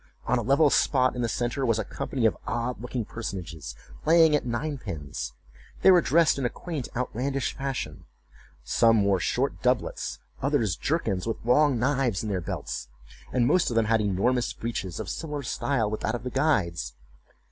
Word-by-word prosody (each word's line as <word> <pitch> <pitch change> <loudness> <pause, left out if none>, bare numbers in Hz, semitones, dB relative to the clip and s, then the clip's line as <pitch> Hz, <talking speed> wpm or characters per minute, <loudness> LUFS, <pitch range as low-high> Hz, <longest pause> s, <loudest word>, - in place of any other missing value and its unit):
On 125 - +2
a - - -1
level 140 +5 +4
spot 130 -2 +3
in 125 - -2
the 120 - 0
centre 120 +4 -1
was 115 -4 +2
a 110 - 0
company 120 +4 -3
of 110 - +3
odd 120 0 -2
looking 125 -2 -3
personages 90 - -6 0.3
playing 160 -1 +6
at 145 - -1
nine 140 +4 -2
pins. 70 - -5 0.5
They 190 - +8
were 180 -2 +7
dressed 160 -1 +3
in 135 - -1
a - - +2
quaint 155 -4 -5
outlandish 125 +2 -2
fashion; 135 - -4 0.6
some 115 - +4
wore 100 -2 +2
short 130 +10 -1
doublets, 125 -3 0 0.2
others 125 - +1
jerkins, 110 - -1
with 115 - -4
long 135 +2 +4
knives 125 -4 +1
in 110 - -3
their 95 -3 -1
belts, 75 - -5 0.4
and 125 -2 +2
most 170 +7 +3
of 120 - -3
them 115 -1 +3
had 110 0 +2
enormous 105 +5 +1
breeches, 100 -6 -4
of - - -4
similar 150 -3 -4
style 125 -2 0
with 110 - -2
that 110 - 0
of 120 - -6
the 125 - -4
guide's. 90 - 0
120 Hz, 180 wpm, -27 LUFS, 110-140 Hz, 0.6 s, They